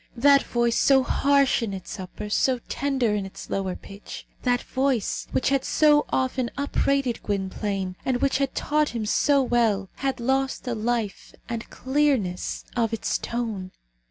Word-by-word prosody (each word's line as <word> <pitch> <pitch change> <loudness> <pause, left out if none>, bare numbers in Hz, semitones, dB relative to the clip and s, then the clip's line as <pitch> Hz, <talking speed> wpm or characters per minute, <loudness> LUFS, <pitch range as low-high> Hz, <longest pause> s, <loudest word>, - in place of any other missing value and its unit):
That 280 +3 +6
voice, 235 -1 +1
so 270 -1 +5
harsh 280 0 +3
in 220 -4 -2
its 190 +1 -7
upper, 185 +3 -7
so 255 +3 +2
tender 265 -5 0
in 205 -1 -1
its 195 - -9
lower, 190 -2 -1
pitch; 200 +1 -10 0.2
that 245 -1 +1
voice, 260 -4 -1
which - - +1
had 275 -1 +1
so 295 -1 +4
often 260 -2 0
upbraided 275 -3 0
Gwynplaine, 195 -1 -2
and 255 -2 0
which 275 0 +1
had 275 -1 -1
taught 300 0 +1
him 220 -2 -2
so 280 +6 +3
well, 225 -6 +1
had 270 -2 -1
lost 265 +2 0
the 245 - -2
life 225 -2 -2
and 230 -1 -5
clearness 260 -10 0
of 230 -2 +1
its 225 - -1
tone. 220 -6 -4
240 Hz, 155 wpm, -25 LUFS, 210-275 Hz, 0.2 s, That